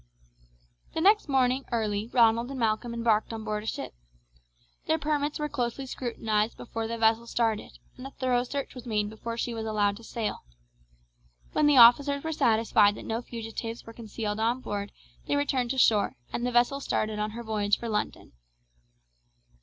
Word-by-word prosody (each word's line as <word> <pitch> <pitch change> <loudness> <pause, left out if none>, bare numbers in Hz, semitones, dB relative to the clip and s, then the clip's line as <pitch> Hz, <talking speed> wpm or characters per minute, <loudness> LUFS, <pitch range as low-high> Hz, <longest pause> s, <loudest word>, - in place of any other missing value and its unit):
The - - 0
next 410 -2 +4
morning 260 0 +2
early 215 -2 -1
Ronald 235 0 +4
and 275 -1 -5
Malcolm 225 +1 0
embarked 230 -2 +1
on 225 -1 -5
board 210 -1 -2
a 215 - -9
ship. - - -4 0.9
Their 320 - +3
permits 295 -1 -1
were 300 - -2
closely 265 -2 -3
scrutinized 225 -4 -2
before 225 -1 -5
the 230 +1 -4
vessel 225 +1 +2
started, 225 -3 -1 0.2
and 255 +1 -7
a - - -9
thorough 255 -2 0
search 275 +2 -4
was 250 -1 -10
made 210 -2 0
before 230 +1 -6
she 235 0 -2
was 220 -1 -4
allowed 205 -2 +1
to 230 - -14
sail. 225 -1 -3 1.1
When 300 - +3
the 290 -2 +5
officers 280 +4 +7
were 320 - -2
satisfied 220 -5 +3
that - - -9
no 225 +1 -2
fugitives 230 -1 -6
were 230 - -10
concealed 220 -2 -4
on 235 +3 +1
board 205 -3 -4 0.4
they - - +1
returned 270 -4 0
to 265 - -2
shore, 215 - +3 0.2
and 240 - -1
the - - -1
vessel 240 +3 +3
started 215 -5 -1
on 210 0 -1
her 235 - -5
voyage 210 -2 +1
for 235 - -6
London. 210 -2 -3
230 Hz, 175 wpm, -28 LUFS, 220-255 Hz, 1.1 s, officers